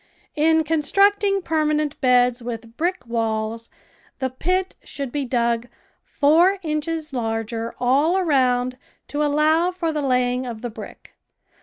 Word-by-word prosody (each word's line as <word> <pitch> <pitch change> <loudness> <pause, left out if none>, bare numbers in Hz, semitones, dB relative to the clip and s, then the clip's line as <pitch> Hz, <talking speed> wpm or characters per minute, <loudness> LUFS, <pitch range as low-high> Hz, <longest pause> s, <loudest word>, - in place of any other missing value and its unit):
In 320 +1 +3
constructing 395 +6 +2
permanent 305 -2 0
beds 250 -1 +3
with 230 -1 -7
brick 345 -2 -2
walls, 225 -1 -2 0.5
the 260 -1 -2
pit 365 +8 -1
should 275 -3 -6
be 285 0 -2
dug 235 -1 0 0.4
four 335 +7 +3
inches 310 -1 -3
larger 225 -1 -3
all 280 +9 +2
around 255 -7 +1 0.3
to 295 - -2
allow 305 +4 +3
for 355 -3 -2
the 300 - -1
laying 250 -1 0
of 230 -2 -7
the 240 - -4
brick. - - -11
280 Hz, 130 wpm, -22 LUFS, 245-320 Hz, 0.5 s, In